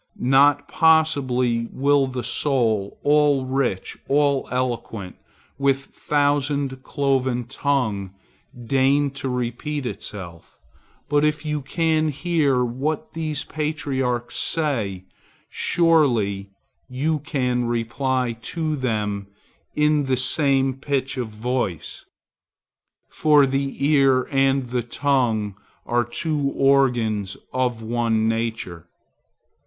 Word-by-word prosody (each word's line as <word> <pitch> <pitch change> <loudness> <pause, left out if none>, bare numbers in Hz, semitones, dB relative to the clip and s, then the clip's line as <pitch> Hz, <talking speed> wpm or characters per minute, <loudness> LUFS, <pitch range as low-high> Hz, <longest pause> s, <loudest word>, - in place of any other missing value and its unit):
Not 145 +3 +4
possibly 130 -8 +2
will 140 0 +2
the 130 -1 -4
soul, 115 -5 0
all 145 -2 +3
rich, 130 -7 -2
all 140 -1 +2
eloquent, 120 -6 -3 0.4
with 140 -1 +3 0.2
thousand 145 -2 0
cloven 130 -3 0
tongue, 115 -7 -1 0.5
deign 135 +3 +2
to 135 -1 -5
repeat 125 +4 -3
itself; 90 -8 -7 0.5
but 145 0 +2
if 150 +1 0
you 150 -1 -2
can 160 +2 +1
hear 145 -4 +1
what 135 +6 -3
these 155 -3 -3
patriarchs 135 -6 -2
say, 115 - -1 0.5
surely 120 - +2 0.4
you 150 +5 -1
can 125 -5 -1
reply 120 +1 -1
to 155 +3 -2
them 105 -6 -2 0.5
in 150 -1 +2
the 130 -1 +1
same 135 0 +2
pitch 135 0 -2
of 125 -3 -3
voice; 110 -5 -3 1.1
for 150 -2 +4
the 135 +1 -2
ear 135 -3 +4
and 135 -2 +2
the 125 0 0
tongue 120 -5 0 0.3
are 120 0 +1
two 145 +3 -1
organs 120 -8 +2 0.2
of 125 -3 -1
one 115 -1 0
nature. 115 -7 -3
130 Hz, 100 wpm, -23 LUFS, 120-145 Hz, 1.1 s, Not